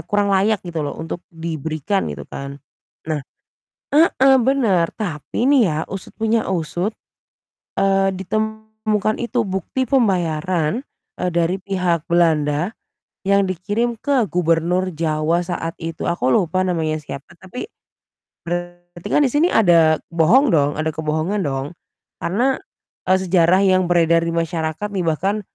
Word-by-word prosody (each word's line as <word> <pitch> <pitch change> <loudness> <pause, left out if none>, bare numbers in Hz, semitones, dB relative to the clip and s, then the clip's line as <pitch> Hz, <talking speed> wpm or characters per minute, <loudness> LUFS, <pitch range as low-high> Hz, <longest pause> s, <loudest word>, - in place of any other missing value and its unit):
kurang 205 -1 +1
layak 200 +2 +2
gitu 170 -3 -4
loh 145 - -4
untuk 165 +2 -5
diberikan 160 +2 -2
gitu 70 -1 -6
kan. 140 0 -7 0.5
Nah 155 -2 -1 0.7
heeh, 275 -3 +5
bener 225 -10 +2
tapi 190 - -3
nih 280 -3 +5
ya 150 - -2
usut 195 -1 -7
punya 225 0 +1
usut, 175 +3 -2 0.9
eee, 195 0 +3
ditemukan 215 +2 -2
itu 240 0 0
bukti 190 +7 -2
pembayaran, 180 - +1 0.4
eee, 180 - 0
dari 170 +2 +1
pihak 180 -4 -1
Belanda 160 0 +2 0.5
yang 200 0 +3
dikirim 205 +7 -1
ke 265 -7 +1
Gubernur 175 +2 +1
Jawa 155 +1 0
saat 170 -2 -4
itu 165 0 -5
aku 130 -7 0
lupa 175 +5 +2
namanya 160 -4 0
siapa, 145 +1 -9
tapi 190 +7 -7 0.8
Berarti 175 0 -6
kan 295 - +4
di - - +2
sini 310 +4 +3
ada 165 - +5 0.2
bohong 220 - +4
dong, 145 -2 +3
ada 155 0 -1
kebohongan 160 +6 -1
dong 135 +3 -3 0.5
karena, 250 +9 +1 0.5
eee, 185 - +5
sejarah 180 -1 +4
yang 185 -1 +3
beredar 170 -1 +4
di 170 - -1
masyarakat 165 +2 -2
nih 190 - 0
bahkan 195 +7 0
180 Hz, 135 wpm, -20 LUFS, 160-205 Hz, 0.9 s, heeh